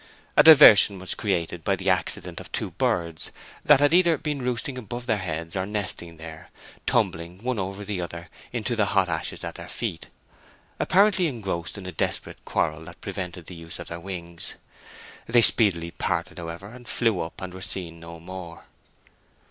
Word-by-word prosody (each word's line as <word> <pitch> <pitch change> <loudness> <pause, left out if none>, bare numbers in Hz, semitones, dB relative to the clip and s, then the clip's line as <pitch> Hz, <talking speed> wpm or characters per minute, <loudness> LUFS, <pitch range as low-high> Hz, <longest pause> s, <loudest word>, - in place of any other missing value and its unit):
A - - +8
diversion 115 -10 +9
was 95 0 -3
created 90 -4 -2
by 100 - +2
the 95 0 +1
accident 90 - +1
of - - -10
two - - -2
birds, 85 -2 -1 0.3
that 150 -2 +7
had 145 +2 +4
either 170 -3 +5
been 150 -2 -3
roosting 125 +1 -1
above 120 +1 -6
their 110 -4 +1
heads 85 -1 -4
or 95 0 -1
nesting 95 -5 -4
there, 80 0 -10 0.4
tumbling 85 +5 0
one 125 -3 -1
over 95 +2 -4
the 100 -3 -3
other 85 0 -6 0.2
into 120 0 -1
the 110 -2 +3
hot 95 -2 +4
ashes 80 -1 -3
at - - -4
their - - -9
feet, - - -4 0.7
apparently 190 -2 +4
engrossed 100 - -4
in 100 - -8
a 90 - -5
desperate 80 - -3
quarrel 80 +1 -1
that - - -12
prevented 90 -2 -5
the 90 - -9
use 85 -1 -7
of 85 - -7
their 85 - -5
wings. 85 -2 -6 0.7
They 120 0 +5
speedily 85 -8 +3
parted, - - -2
however, 85 +4 -7
and 120 +1 -13
flew 115 -6 +1
up, 80 - -5
and 90 -1 -6
were 95 - -9
seen 85 -3 -4
no 85 0 -10
more. 85 -1 -9
95 Hz, 180 wpm, -25 LUFS, 85-115 Hz, 0.7 s, diversion